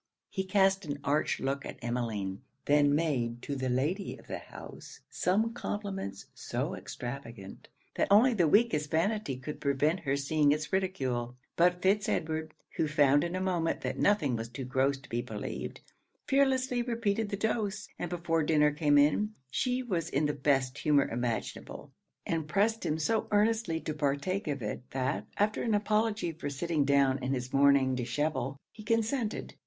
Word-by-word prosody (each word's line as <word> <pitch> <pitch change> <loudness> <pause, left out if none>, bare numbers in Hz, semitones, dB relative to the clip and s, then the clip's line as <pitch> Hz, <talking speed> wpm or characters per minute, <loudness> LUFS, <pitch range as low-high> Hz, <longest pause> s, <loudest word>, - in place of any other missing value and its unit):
He 190 -1 -2
cast 195 0 +3
an 145 -3 -4
arch 145 +2 +1
look 140 +1 -2
at - - -7
Emmeline; 115 -5 -3 0.2
then 145 0 +4
made 125 -7 -1
to 140 - -3
the 130 -1 -2
Lady 150 +11 -1
of - - -17
the - - -5
house - - -11
some 220 +5 +1
compliments 195 - -4
so - - -3
extravagant, 120 -6 -8 0.3
that - - +1
only 225 +6 +6
the 175 -7 +3
weakest 155 -6 +3
vanity 165 - 0
could 140 +4 -7
prevent 145 +5 +1
her 140 -1 -1
seeing 145 +1 +2
its 150 +1 -2
ridicule. 130 -11 -1 0.2
But 180 +1 +3
Fitz 195 +1 +2
Edward, 160 0 -2 0.2
who 160 - +2
found 145 -1 +4
in 175 +1 -2
a - - -1
moment 175 -3 0
that - - -3
nothing 155 - +3
was 115 0 -4
too 130 +2 -6
gross 135 +2 +1
to 135 - -15
be 120 +1 -2
believed, 125 - -6 0.4
fearlessly 260 -3 +2
repeated 225 -3 -1
the 200 - -3
dose; 210 -1 -1
and 175 - -3
before 165 -2 0
dinner 150 -1 +3
came 150 -1 +3
in, 180 +10 +3 0.2
she 255 0 0
was 175 -9 -2
in 145 +1 +1
the 145 - +1
best 135 -2 +1
humour 145 -3 +3
imaginable, 120 -1 -4 0.3
and 160 -2 -1
pressed 210 +7 +1
him 155 - 0
so 215 +7 0
earnestly 210 -5 +2
to 155 - -3
partake 150 +7 -1
of 140 -5 -2
it, 105 - -3
that, 130 +2 -2
after 210 +1 +1
an 225 -3 +1
apology 210 -2 +1
for 160 -2 -5
sitting 150 +1 0
down 135 -1 +3
in 130 +2 0
his 125 0 -5
morning 140 -1 +5
dishabille, 135 +2 -2
he 220 - -12
consented. 230 +1 -1
155 Hz, 170 wpm, -30 LUFS, 135-200 Hz, 0.4 s, only